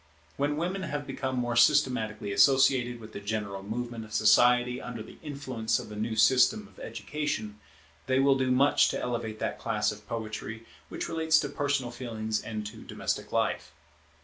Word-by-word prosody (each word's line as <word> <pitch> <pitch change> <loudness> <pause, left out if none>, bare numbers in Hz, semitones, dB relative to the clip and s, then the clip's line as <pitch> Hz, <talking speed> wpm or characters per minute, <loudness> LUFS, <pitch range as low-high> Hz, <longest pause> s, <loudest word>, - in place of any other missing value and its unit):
When 145 +1 0
women 180 +4 -2
have 145 -4 -3
become 130 -1 -3
more 120 -1 -1
systematically 120 -6 +3
associated 120 +2 +4
with 110 -1 -12
the - - -5
general 100 -1 -3
movement 115 +3 -5
of 110 0 -8
society 125 +3 +4
under 120 -3 -6
the - - -14
influence 135 -7 -2
of - - -7
the 105 - -8
new 110 +2 -2
system 135 - +4
of - - -19
education, 110 -9 -4 0.5
they 130 0 +2
will 135 +1 +5
do 130 -1 0
much 135 +3 +4
to - - -2
elevate 115 -3 -3
that - - -3
class 105 -2 0
of 105 0 -11
poetry 110 0 -5 0.2
which - - -4
relates 160 -1 +2
to 145 - -3
personal 140 -3 -1
feelings 110 -3 -3
and 110 -1 -5
to 110 +1 -8
domestic - - -3
life. - - -1
120 Hz, 175 wpm, -29 LUFS, 110-135 Hz, 0.5 s, will